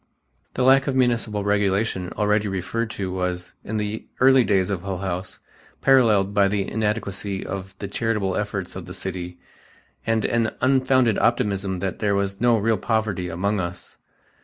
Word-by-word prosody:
The 130 - +1
lack 135 +2 +5
of 135 - 0
municipal 120 -5 +1
regulation 100 -2 0
already 105 0 +1
referred 100 +4 -2
to 95 -4 -4
was, 90 -1 -3
in 110 - -3
the 105 +1 -3
early 130 0 +6
days 100 -3 +1
of 95 -4 -2
Hull 95 0 -4
House, 90 0 -4 0.4
parallelled 110 -7 +4
by 100 -1 +4
the 100 -1 -1
inadequacy 105 -3 -2
of 95 0 -6
the 100 - -5
charitable 105 -2 -1
efforts 100 -3 -3
of - - -7
the - - -7
city 90 -1 -5 0.7
and 115 -1 0
an 115 -1 0
unfounded 130 -3 +3
optimism 100 -5 0
that 95 -1 -3
there 100 -2 +1
was 100 0 -2
no 120 -1 +4
real 110 0 +1
poverty 110 -6 -1
among 100 +5 -1
us. 90 -1 -6
100 Hz, 160 wpm, -23 LUFS, 95-115 Hz, 0.7 s, early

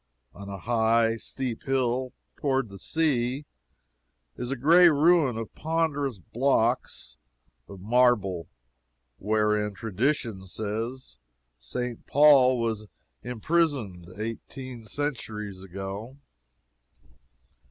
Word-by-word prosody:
On 100 0 -9
a 100 - -5
high, 115 +1 +2
steep 125 0 -5
hill, 130 -1 0 0.3
toward 135 -5 0
the 100 0 -11
sea, 140 - 0 0.9
is 125 - -5
a 135 - -1
gray 170 +7 +6
ruin 150 -4 +4
of 115 -1 -6
ponderous 155 -6 -1
blocks 120 - 0 0.5
of 100 - -10
marble, 105 - +2 0.7
wherein, 105 0 +1
tradition 115 -2 -1
says, 110 - -5 0.4
St. 120 - -5
Paul 140 -3 +6
was 110 -2 -2 0.3
imprisoned 125 - -1
eighteen 115 +2 -6
centuries 105 -7 -4
ago. 95 +7 -7
120 Hz, 90 wpm, -27 LUFS, 105-135 Hz, 0.9 s, gray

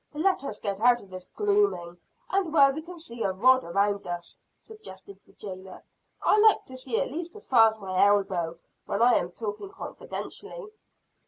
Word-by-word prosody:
"Let 350 +1 +1
us 210 -6 -5
get 200 -2 -3
out 245 0 +5
of 195 - -17
this 185 -1 -9
glooming, 400 - 0 0.3
and 380 -4 0
where 280 -3 +5
we 310 - -5
can 350 +2 -11
see 235 -8 -9
a 195 - +1
rod 255 +7 +4
around 200 +3 0
us," 175 -1 -6 0.2
suggested 200 - -13
the - - -22
jailer. 185 -2 -10 0.4
"I 425 - +4
like 435 0 +5
to 260 - -10
see 255 -3 -2
at - - -2
least 340 +5 -6
as 425 - -11
far 230 -3 +6
as 220 0 -2
my 190 -3 0
elbow, 190 -5 +1 0.3
when 200 - -2
I 245 0 +6
am 175 - -4
talking 210 - -6
confidentially." 425 +3 -8
225 Hz, 185 wpm, -27 LUFS, -, 0.4 s, far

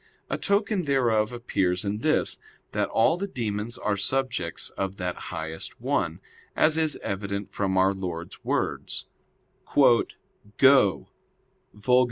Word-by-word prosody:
A - - 0
token 200 -2 +1
thereof 120 -6 +2
appears 95 -6 -1
in 100 +1 -1
this, 155 +6 +1 0.3
that - - 0
all 115 +9 +3
the 200 +2 -3
demons 115 - -3
are 105 - 0
subjects 130 +6 -1
of 95 0 -3
that 90 -2 -3
highest 80 0 -5
one; - - -1 0.3
as 155 0 +4
is 160 -2 +2
evident 100 0 -4
from 95 -2 0
our 95 +1 +4
Lord's 90 -3 -6
words: - - -2 0.7
"Go 125 -2 +3 0.7
[Vulg. 105 +3 -11
105 Hz, 125 wpm, -26 LUFS, 95-135 Hz, 0.7 s, as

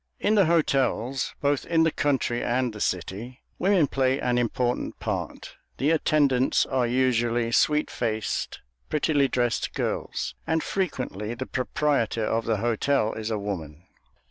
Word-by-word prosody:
In 210 - +2
the 200 -3 +5
hotels, 135 -5 +1
both 145 -1 +1
in 165 -1 +2
the 160 - +3
country 135 -5 0
and 125 -1 0
the 105 - -8
city, 105 +8 -3 0.2
women 185 -3 +4
play 135 -1 +1
an 125 0 +1
important 120 +1 -1
part. - - -5 0.2
The 145 +4 +2
attendants 145 -5 +3
are 130 -3 0
usually 120 -2 +1
sweet 150 +5 +2
faced, 110 -1 -2 0.3
prettily 145 -2 +2
dressed 120 -2 -1
girls, - - -2
and 160 0 +1
frequently 125 - -3
the 130 - -4
proprietor 125 -4 0
of 115 +1 0
the 115 -2 +1
hotel 115 +2 +1
is 110 0 -4
a 110 - -1
woman. 85 -6 -5
125 Hz, 145 wpm, -26 LUFS, 115-145 Hz, 0.3 s, the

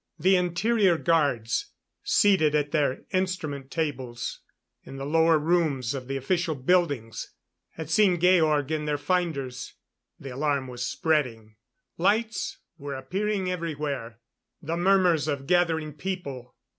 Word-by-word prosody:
The 185 +4 +4
interior 180 +2 +2
guards 140 -10 0 0.3
seated 160 -7 +3
at 145 -1 0
their 145 -4 0
instrument 160 -8 -2
tables 130 -7 -3 0.4
in - - -10
the 135 - -5
lower 160 +2 +4
rooms 150 -6 +1
of 130 -2 -6
the 135 0 -2
official 165 +3 -1
buildings 140 - 0 0.4
had 160 -2 -7
seen 185 -1 +4
Georg 160 -5 +3
in 155 -1 -1
their 150 -1 0
finders. 140 -6 -2 0.5
The 135 - -8
alarm 140 0 0
was 125 -1 -5
spreading. 125 - -1 0.4
Lights 220 +5 0 0.2
were 140 -1 -5
appearing 190 +7 -2
everywhere.... 145 -9 -4 0.4
The 165 0 -3
murmurs 175 -3 +3
of 140 -2 -2
gathering 160 -2 +1
people 145 -7 -6
155 Hz, 125 wpm, -26 LUFS, 135-180 Hz, 0.5 s, The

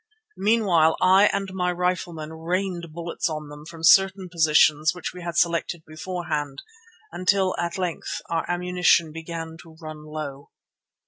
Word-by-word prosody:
Meanwhile 190 -7 +3
I 190 +2 +6
and 195 -1 -2
my 180 -1 0
riflemen 175 -3 -2
rained 175 +1 -3
bullets 170 +1 -3
on 155 -1 -5
them 150 +1 -11
from 165 -1 -11
certain 190 +1 +5
positions 155 -1 +3
which 180 -3 -5
we 180 - -9
had 170 -1 -5
selected 170 -1 0
beforehand, 155 -3 -4 0.5
until 185 +1 +1
at 170 +1 -2
length 180 -3 -3
our 165 -1 -1
ammunition 175 -2 +2
began 165 0 -7
to 165 -2 -16
run 155 -2 -9
low. 145 -2 -7
170 Hz, 140 wpm, -24 LUFS, 155-180 Hz, 0.5 s, I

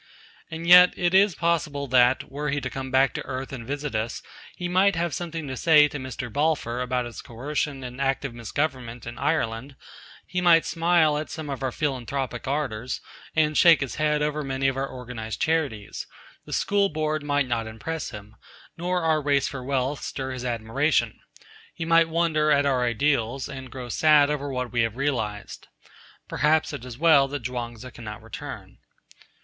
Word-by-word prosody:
And 160 +1 -6
yet 180 +1 +8
it 175 0 +1
is 195 -2 +5
possible 155 -4 0
that, 125 0 +3
were 150 +2 -3
he 145 +1 0
to - - -4
come 135 0 -5
back 130 0 +3
to - - -4
earth 130 0 -5
and 120 -3 -7
visit 145 0 -3
us, 110 +1 -3 0.3
he 175 - -4
might 185 +2 +3
have 170 -1 -1
something 165 -3 -4
to 130 - -4
say 150 +3 +6
to 145 -1 -6
Mr. 130 -2 -6
Balfour 145 -5 0
about 125 0 -1
his 120 -2 -8
coercion 140 +3 -3
and 125 +1 -7
active 135 -1 -1
misgovernment 120 0 -3
in 120 0 -7
Ireland; 135 -3 -1 0.5
he 180 0 -2
might 170 -2 +5
smile 165 -3 +2
at 155 - -5
some 155 -3 -6
of 135 - -5
our 130 -1 -1
philanthropic 130 -3 -3
ardours, 130 -4 -2 0.4
and 155 -1 +2
shake 170 -2 +6
his 135 - -3
head 150 -1 +1
over 150 0 -1
many 135 0 -1
of 135 - 0
our 135 0 -3
organised 120 -3 -6
charities; 145 -11 -1 0.4
the - - -11
School 200 -1 +2
Board 155 -1 -1
might 145 -2 0
not 115 -2 -1
impress 150 +9 -5
him, 105 -1 -11 0.4
nor 180 +1 -1
our 160 -1 +2
race 140 -2 +2
for 140 -3 -6
wealth 135 +1 -1
stir 130 -1 -4
his 130 -1 -5
admiration; 120 +5 0 0.6
he 165 - -4
might 165 0 +4
wonder 160 -2 +1
at 145 -1 +4
our 130 -3 +2
ideals, 125 +1 0
and 130 -1 -8
grow 125 -2 -7
sad 150 +3 +4
over 145 -1 -3
what 125 -2 -3
we 120 -1 +1
have 115 -1 0
realised. 115 -7 -3 0.6
Perhaps 155 0 +1
it 130 -3 -6
is 125 -2 -8
well 150 -3 +5
that 140 -2 -5
Chuang 120 -1 -4
Tzu 125 +3 -10
cannot 105 -3 -9
return. - - -9
140 Hz, 185 wpm, -25 LUFS, 125-155 Hz, 0.6 s, yet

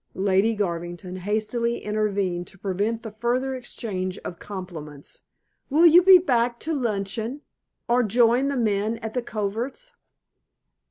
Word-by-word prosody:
Lady 195 +3 +2
Garvington 175 -1 -4
hastily 220 +5 -1
intervened 200 -4 -1
to 195 - -13
prevent 205 +4 -2
the 220 - -6
further 240 +5 -1
exchange 200 -7 -4
of 175 - -6
compliments. 165 -8 -8 0.5
"Will 310 +5 +5
you 340 +1 +8
be 375 +1 +9
back 245 -8 +1
to 320 - -2
luncheon, 230 +1 -2 0.5
or 240 +1 +3
join 240 +4 +3
the 280 -1 -1
men 215 -1 0
at 220 -1 -4
the 250 - 0
coverts?" 235 - -4
220 Hz, 130 wpm, -24 LUFS, 195-245 Hz, 0.5 s, be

